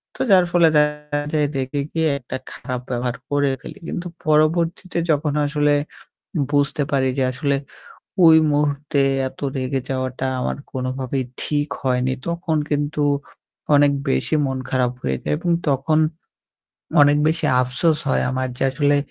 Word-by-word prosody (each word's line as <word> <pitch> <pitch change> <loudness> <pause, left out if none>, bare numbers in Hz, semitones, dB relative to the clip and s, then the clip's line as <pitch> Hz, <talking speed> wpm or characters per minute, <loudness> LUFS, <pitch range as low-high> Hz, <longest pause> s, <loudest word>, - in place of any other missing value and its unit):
তো - - -5
যার 185 -2 +6
ফলে 170 -2 +5
দেখা 150 0 0
যায় 150 -1 +2
রেগে 135 +2 -2
গিয়ে 160 -1 +1
একটা 130 0 -6
খারাপ 125 -1 -5
ব্যবহার 125 0 -2
করে 145 -1 +2
ফেলি। - - -10
কিন্তু 175 - -4 0.2
পরবর্তীতে 165 +4 +1
যখন 150 -1 +1
আসলে 145 0 +2 0.8
বুঝতে 145 0 +1
পারি 130 -1 +2
যে - - +3
আসলে 140 +1 0 0.7
ওই 160 -1 +8 0.2
মুহূর্তে 145 0 0 0.3
এত 135 - -17 0.2
রেগে 130 +1 -1
যাওয়াটা 130 0 -2
আমার - - -2
কোনভাবেই 130 0 -3 0.2
ঠিক 145 0 -1
হয়নি। 130 -1 +1 0.2
তখন 170 -1 -1
কিন্তু 145 0 0 0.7
অনেক 145 0 +5 0.2
বেশি 155 - 0
মন 130 -1 -2
খারাপ 125 -2 +1
হয়ে 65 0 -1
যায় 75 - 0
এবং 175 - -2 0.2
তখন 140 +3 +2 1.0
অনেক 145 0 +5
বেশি 160 +1 0 0.2
আফসোস 150 +5 +1
হয় - - +2
আমার 130 0 -1
যে, - - -4
"আসলে 145 +1 +2
145 Hz, 145 wpm, -21 LUFS, 130-150 Hz, 1.0 s, ওই